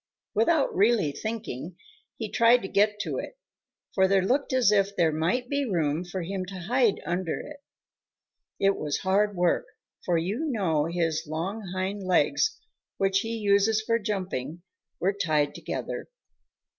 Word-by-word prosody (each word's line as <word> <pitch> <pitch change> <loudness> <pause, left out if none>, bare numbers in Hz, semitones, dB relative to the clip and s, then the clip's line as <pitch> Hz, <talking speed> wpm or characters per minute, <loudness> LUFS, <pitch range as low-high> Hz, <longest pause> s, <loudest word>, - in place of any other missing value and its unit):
Without 275 +7 +2
really 205 -6 +3
thinking, 180 - -5 0.4
he 220 - -3
tried 235 0 +5
to - - -3
get 210 +2 +2
to - - -3
it, - - -7 0.6
for 190 -1 +4
there 195 -1 +3
looked 265 +8 +1
as 255 -5 +4
if 200 -1 +2
there 165 -4 +3
might 175 +11 0
be 285 +2 0
room 165 - 0
for 180 0 -5
him 190 +2 -3
to 190 +1 -9
hide 235 +3 +2
under 175 +1 -2
it. 300 0 -9 1.0
It 195 0 +3
was 150 -1 -1
hard 200 +2 +2
work, 175 -1 +1 0.4
for 175 -2 +1
you 200 - -1
know 170 - +1
his 165 -2 -1
long 190 +7 -4
hind 190 +2 -2
legs, 185 - +2 0.4
which 195 0 +2
he 225 +2 -3
uses 205 +1 +3
for 230 0 +2
jumping, 185 - -4 0.4
were 195 +3 +1
tied 155 -7 +1
together. - - -5
195 Hz, 155 wpm, -27 LUFS, 175-220 Hz, 1.0 s, tried